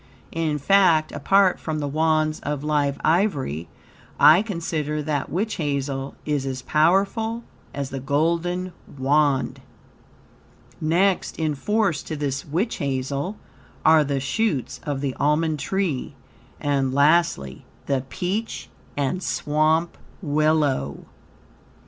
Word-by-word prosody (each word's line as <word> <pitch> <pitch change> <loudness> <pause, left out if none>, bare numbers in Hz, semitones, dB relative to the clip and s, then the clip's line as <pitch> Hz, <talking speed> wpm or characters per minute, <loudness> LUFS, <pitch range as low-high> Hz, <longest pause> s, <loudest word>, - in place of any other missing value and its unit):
In 160 -2 -1
fact, 165 -1 +4
apart 190 +6 +3
from 155 -1 -3
the 145 -1 -2
Wands 155 +1 +1
of 145 -1 -4
live 145 -2 0
ivory, 145 - +1 0.5
I 160 +5 +8
consider 160 -7 -3
that 145 -2 -2
witch 210 +7 -2
hazel 140 -3 -2
is 150 -3 0
as 130 -1 -4
powerful 200 +8 +1 0.3
as 140 -1 -4
the 135 - -4
golden 170 +6 0 0.2
Wand. 140 0 +1 1.2
Next 175 +5 +1
in 155 -2 0
force 195 +2 0
to 155 - -6
this 140 -2 -2
witch 175 +10 -2
hazel 140 +7 -2 0.5
are 160 -1 +6
the 140 -1 -1
shoots 145 - -1
of 140 -2 -2
the 140 -2 -1
almond 150 +1 +1
tree, 165 -2 -2 0.4
and, 140 -2 0
lastly, 145 - +2 0.2
the 135 -2 0
peach 190 - -3 0.3
and 145 +6 -1
swamp 155 +1 0 0.2
willow. 150 - 0
155 Hz, 115 wpm, -23 LUFS, 140-170 Hz, 1.2 s, I